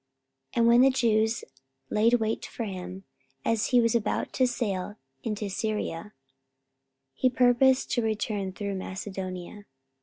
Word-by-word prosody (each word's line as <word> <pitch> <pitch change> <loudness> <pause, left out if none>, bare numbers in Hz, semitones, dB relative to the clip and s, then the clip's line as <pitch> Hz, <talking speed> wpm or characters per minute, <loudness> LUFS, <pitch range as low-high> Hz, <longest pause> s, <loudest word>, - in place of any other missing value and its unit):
And 235 - +3
when 235 +1 +6
the 270 - +7
Jews 225 -3 +2 0.5
laid 225 +3 +4
wait 220 -1 -1
for 235 - -5
him, 185 -2 -6 0.4
as 230 -2 +1
he 250 - +4
was 230 -1 +3
about 225 -3 -1
to 255 - +3
sail 205 -5 -2 0.3
into 210 -2 -3
Syria, 210 -2 -3 1.0
he 255 - +2
purposed 255 +1 +3
to 240 - +2
return 215 -3 -2
through 200 +1 -4
Macedonia. 190 0 -6
215 Hz, 130 wpm, -27 LUFS, 195-235 Hz, 1.0 s, the